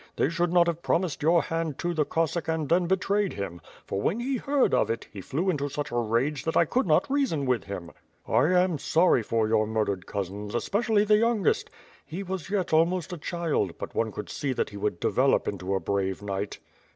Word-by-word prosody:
They -, -, +2 dB
should 170 Hz, 0 st, 0 dB
not 175 Hz, -1 st, +5 dB
have 170 Hz, -1 st, -2 dB
promised 170 Hz, -3 st, 0 dB
your 165 Hz, +2 st, +4 dB
hand 165 Hz, -3 st, -2 dB
to 175 Hz, 0 st, -2 dB
the 155 Hz, -3 st, 0 dB
CoSvSack 165 Hz, 0 st, 0 dB
and 160 Hz, -2 st, -1 dB
then 175 Hz, +2 st, +2 dB
betrayed 195 Hz, +2 st, +1 dB
him; 95 Hz, -4 st, -5 dB, 0.2 s
for 100 Hz, -, -3 dB
when 205 Hz, -, 0 dB
he 260 Hz, +2 st, -1 dB
heard 275 Hz, +1 st, +1 dB
of -, -, +3 dB
it, 115 Hz, 0 st, -3 dB
he 100 Hz, -, -7 dB
flew 155 Hz, -, -2 dB
into 145 Hz, -3 st, -2 dB
such 145 Hz, +1 st, -4 dB
a -, -, -4 dB
rage 120 Hz, +5 st, 0 dB
that 160 Hz, -, 0 dB
I 170 Hz, -, +5 dB
could 245 Hz, -, 0 dB
not 155 Hz, -, +3 dB
reason 265 Hz, -, 0 dB
with 125 Hz, -5 st, 0 dB
him. 90 Hz, -4 st, -6 dB, 0.3 s
1 130 Hz, +10 st, +3 dB
am 180 Hz, -4 st, +2 dB
sorry 165 Hz, -5 st, +3 dB
for 110 Hz, 0 st, 0 dB
your 110 Hz, -1 st, +2 dB
murdered 105 Hz, -4 st, -1 dB
cousins, 100 Hz, +2 st, -4 dB
especially 205 Hz, -, +1 dB
the 210 Hz, 0 st, +5 dB
youngest; 225 Hz, -4 st, +1 dB, 0.3 s
he 180 Hz, +5 st, -6 dB
was 190 Hz, -2 st, -5 dB
yet 195 Hz, -5 st, -1 dB
almost 170 Hz, +2 st, +2 dB
a -, -, -5 dB
child, 160 Hz, -, -1 dB
but -, -, -6 dB
one 110 Hz, -1 st, 0 dB
could 105 Hz, 0 st, -7 dB
see 135 Hz, -3 st, -2 dB
tJiat -, -, -1 dB
he 100 Hz, -, -9 dB
would 100 Hz, -4 st, -2 dB
develop -, -, +2 dB
into 95 Hz, 0 st, -2 dB
a -, -, +1 dB
'brave 95 Hz, +2 st, -2 dB
knight." 100 Hz, 0 st, -3 dB
155 Hz, 215 wpm, -27 LUFS, 110-180 Hz, 0.3 s, not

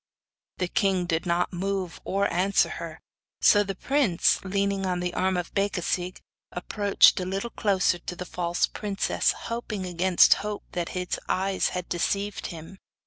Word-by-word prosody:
The 180 Hz, -, -1 dB
king 190 Hz, -1 st, +1 dB
did 170 Hz, 0 st, -1 dB
not 175 Hz, +2 st, 0 dB
move 190 Hz, -1 st, -3 dB
or 200 Hz, +1 st, 0 dB
answer 190 Hz, +3 st, +2 dB
her; -, -, -7 dB, 0.4 s
so 205 Hz, -, +6 dB
the 195 Hz, -1 st, -3 dB
prince, 260 Hz, -8 st, +2 dB
leaning 195 Hz, 0 st, -1 dB
on 180 Hz, -1 st, -1 dB
the 180 Hz, 0 st, -2 dB
arm 185 Hz, 0 st, +1 dB
of 175 Hz, -, -4 dB
Becasigue, 185 Hz, -2 st, -1 dB, 0.3 s
approached 200 Hz, +3 st, +3 dB
a 180 Hz, -, -3 dB
little 195 Hz, +5 st, -3 dB
closer 190 Hz, -5 st, +1 dB
to 180 Hz, -, -6 dB
the 180 Hz, -, -6 dB
false 175 Hz, 0 st, 0 dB
princess, 205 Hz, -2 st, 0 dB
hoping 225 Hz, -4 st, -5 dB
against 180 Hz, 0 st, +5 dB
hope 210 Hz, 0 st, -4 dB
that 175 Hz, -1 st, -3 dB
his 180 Hz, 0 st, -2 dB
eyes 190 Hz, +1 st, +1 dB
had 180 Hz, -, -4 dB
deceived 200 Hz, +4 st, -2 dB
him. 170 Hz, +3 st, -10 dB
190 Hz, 155 wpm, -26 LUFS, 180-200 Hz, 0.4 s, so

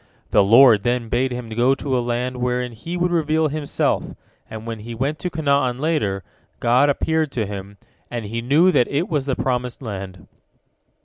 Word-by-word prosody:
The 105 Hz, -, +5 dB
Lord 115 Hz, +1 st, +7 dB
then 120 Hz, 0 st, -1 dB
bade 130 Hz, +3 st, 0 dB
him 125 Hz, -2 st, -5 dB
go 120 Hz, +4 st, +2 dB
to 135 Hz, -1 st, -2 dB
a 125 Hz, -, +2 dB
land 120 Hz, +1 st, -2 dB
wherein 125 Hz, 0 st, -1 dB
He 165 Hz, +11 st, -6 dB
would 175 Hz, 0 st, 0 dB
reveal 160 Hz, -1 st, +1 dB
Himself, 150 Hz, 0 st, -1 dB, 0.5 s
and 110 Hz, 0 st, -8 dB
when 115 Hz, -1 st, -5 dB
he 115 Hz, +2 st, -7 dB
went 140 Hz, +6 st, -2 dB
to 180 Hz, -, -3 dB
Canaan 140 Hz, -6 st, +1 dB
later, 130 Hz, -, -1 dB, 0.4 s
God 125 Hz, +4 st, +3 dB
appeared 155 Hz, +1 st, 0 dB
to 110 Hz, -3 st, -1 dB
him, 100 Hz, 0 st, -8 dB, 0.3 s
and 120 Hz, -3 st, -4 dB
he 115 Hz, +3 st, -4 dB
knew 150 Hz, +10 st, +4 dB
that 125 Hz, -, +3 dB
it 145 Hz, +5 st, -1 dB
was 145 Hz, -4 st, -1 dB
the 135 Hz, -, 0 dB
promised 125 Hz, -1 st, -2 dB
land. 95 Hz, -, -7 dB
125 Hz, 185 wpm, -21 LUFS, 115-145 Hz, 0.5 s, Lord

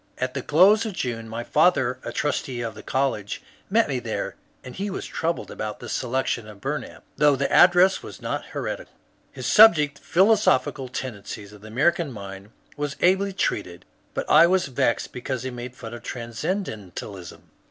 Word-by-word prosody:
At 130 Hz, 0 st, -2 dB
the 140 Hz, -, -3 dB
close 190 Hz, -, +5 dB
of 220 Hz, -3 st, -4 dB
June 115 Hz, -7 st, -4 dB
my 115 Hz, +1 st, -4 dB
father, 130 Hz, -5 st, +2 dB
a -, -, -5 dB
trustee 135 Hz, -4 st, -2 dB
of 115 Hz, -1 st, -4 dB
the -, -, -10 dB
college, 130 Hz, -7 st, -1 dB, 0.3 s
met -, -, +3 dB
me -, -, -1 dB
there, -, -, -4 dB, 0.3 s
and 125 Hz, -, -9 dB
he 200 Hz, +2 st, -3 dB
was 195 Hz, -, -5 dB
troubled 165 Hz, +1 st, -3 dB
about 105 Hz, -1 st, -5 dB
the -, -, -8 dB
selection 125 Hz, -2 st, -1 dB
of 105 Hz, -2 st, -12 dB
Bumap, 145 Hz, +7 st, -5 dB
though 150 Hz, -1 st, +5 dB
the 140 Hz, +1 st, -1 dB
address 180 Hz, +2 st, +6 dB
was -, -, -10 dB
not -, -, -3 dB
heretical. -, -, -5 dB, 0.4 s
His -, -, -8 dB
subject, 150 Hz, -10 st, +6 dB
^^Philosophical 175 Hz, -, +2 dB
Tendencies 105 Hz, -4 st, -6 dB
of 105 Hz, -, -14 dB
the 110 Hz, -, -11 dB
American 145 Hz, +6 st, +1 dB
Mind," 100 Hz, -2 st, -9 dB, 0.3 s
was 145 Hz, -1 st, -3 dB
ably 190 Hz, +2 st, +3 dB
treated, 100 Hz, -, -2 dB, 0.3 s
but -, -, -2 dB
I 160 Hz, +3 st, +7 dB
was 185 Hz, 0 st, +2 dB
vexed 120 Hz, -2 st, 0 dB
because 125 Hz, 0 st, -4 dB
he 130 Hz, -, -4 dB
made 125 Hz, +1 st, -7 dB
fun 120 Hz, -3 st, -9 dB
of 120 Hz, -, -8 dB
Transcendentalism. 110 Hz, -, -5 dB
130 Hz, 175 wpm, -24 LUFS, 115-170 Hz, 0.4 s, I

